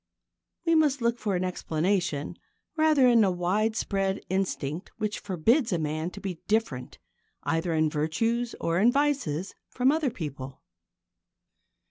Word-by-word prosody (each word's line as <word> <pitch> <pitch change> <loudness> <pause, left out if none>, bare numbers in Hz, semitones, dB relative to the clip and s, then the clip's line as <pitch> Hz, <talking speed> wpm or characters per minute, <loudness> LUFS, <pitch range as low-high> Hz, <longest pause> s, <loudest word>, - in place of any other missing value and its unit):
We 330 - +3
must 300 -4 +3
look 235 0 0
for 205 -3 -1
an 180 - 0
explanation 175 -3 -1 0.4
rather 310 -4 +4
in 235 -2 +6
the 200 - +4
widespread 195 +1 0
instinct 185 -3 -2
which 215 -1 -2
forbids 220 - +1
a 175 - +2
man 155 +1 -2
to 200 - -10
be 190 -4 -5
different 210 - -1 0.5
either 165 +1 0
in 155 0 +3
virtues 225 +11 -1
or 165 +1 0
in 230 +5 +5
vices 265 - 0 0.2
from 255 +2 +2
other 310 -2 +1
people. 135 - -7
195 Hz, 135 wpm, -27 LUFS, 165-235 Hz, 0.5 s, in